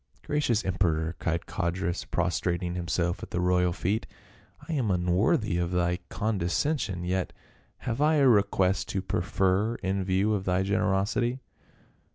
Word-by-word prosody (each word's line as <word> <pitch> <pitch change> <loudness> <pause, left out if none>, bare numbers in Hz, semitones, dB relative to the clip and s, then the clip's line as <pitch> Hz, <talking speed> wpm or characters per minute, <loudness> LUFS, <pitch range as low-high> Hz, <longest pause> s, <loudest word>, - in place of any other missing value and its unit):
" - - -34
Gracious 125 -7 +1
emperor," 85 -3 0
cried 85 0 -1
Codrus 85 -1 -2
prostrating 90 0 -1
him 90 -1 -4
self 85 +3 0
at - - -7
the 85 - -2
royal 90 0 +2
feet, 100 +4 -1 0.3
" - - -22
I 165 - -3
am 130 -8 0
unworthy 90 +1 +2
of 85 -1 0
thy 90 0 0
con 110 -1 -1
descension, 95 - -1
yet 95 0 -1 0.5
have 120 +2 -2
I 155 +1 +4
a 140 -3 +5
request 95 - +2
to 95 - -2
prefer 95 +4 +1
in 95 -1 -2
view 95 +3 +1
of 100 -3 -1
thy 90 +1 +1
generosity." 105 +4 +1
95 Hz, 160 wpm, -28 LUFS, 90-105 Hz, 0.5 s, a